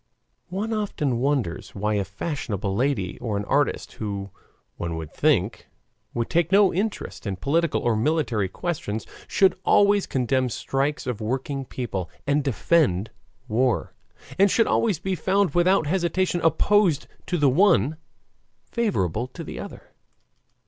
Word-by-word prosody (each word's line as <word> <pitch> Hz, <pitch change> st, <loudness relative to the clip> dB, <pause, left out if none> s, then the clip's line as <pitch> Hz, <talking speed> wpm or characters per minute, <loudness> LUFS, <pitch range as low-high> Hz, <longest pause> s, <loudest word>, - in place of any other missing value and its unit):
One 205 Hz, +5 st, -2 dB
often 150 Hz, -, -1 dB
wonders 130 Hz, -, -1 dB
why 105 Hz, +2 st, 0 dB
a 100 Hz, -1 st, +1 dB
fashionable 100 Hz, -, -3 dB
lady 110 Hz, -7 st, -1 dB
or 110 Hz, -4 st, -2 dB
an 100 Hz, -, -3 dB
artist, 145 Hz, +6 st, 0 dB
who, 100 Hz, -2 st, -5 dB, 0.5 s
one 85 Hz, -1 st, -3 dB
would 80 Hz, -2 st, -7 dB
think, -, -, +1 dB, 0.5 s
would 115 Hz, -1 st, -1 dB
take 170 Hz, 0 st, +1 dB
no 200 Hz, 0 st, +5 dB
interest 195 Hz, -, -3 dB
in 100 Hz, -, -1 dB
political 160 Hz, -, +1 dB
or 120 Hz, -2 st, +2 dB
military 115 Hz, -, +1 dB
questions, 110 Hz, -, -3 dB, 0.2 s
should 190 Hz, -1 st, +3 dB
always 205 Hz, 0 st, +4 dB
condemn 130 Hz, 0 st, +1 dB
strikes 135 Hz, +5 st, -1 dB
of 125 Hz, -5 st, -3 dB
working 135 Hz, +4 st, -2 dB
people, 100 Hz, -9 st, -4 dB, 0.2 s
and 145 Hz, +1 st, +2 dB
defend 125 Hz, -, +2 dB, 0.4 s
war; 125 Hz, +2 st, +1 dB, 0.5 s
and 200 Hz, +1 st, +6 dB
should 225 Hz, +4 st, +3 dB
always 215 Hz, -7 st, +2 dB
be 190 Hz, +4 st, -2 dB
found 190 Hz, +2 st, +1 dB
without 175 Hz, 0 st, +3 dB
hesitation 175 Hz, +1 st, 0 dB
opposed 170 Hz, -1 st, +3 dB, 0.2 s
to 180 Hz, -, 0 dB
the 145 Hz, -3 st, +3 dB
one, 155 Hz, -, +4 dB, 0.7 s
favorable 125 Hz, -, 0 dB
to 130 Hz, -, -9 dB
the -, -, -7 dB
other. -, -, -9 dB
140 Hz, 140 wpm, -24 LUFS, 110-180 Hz, 0.7 s, and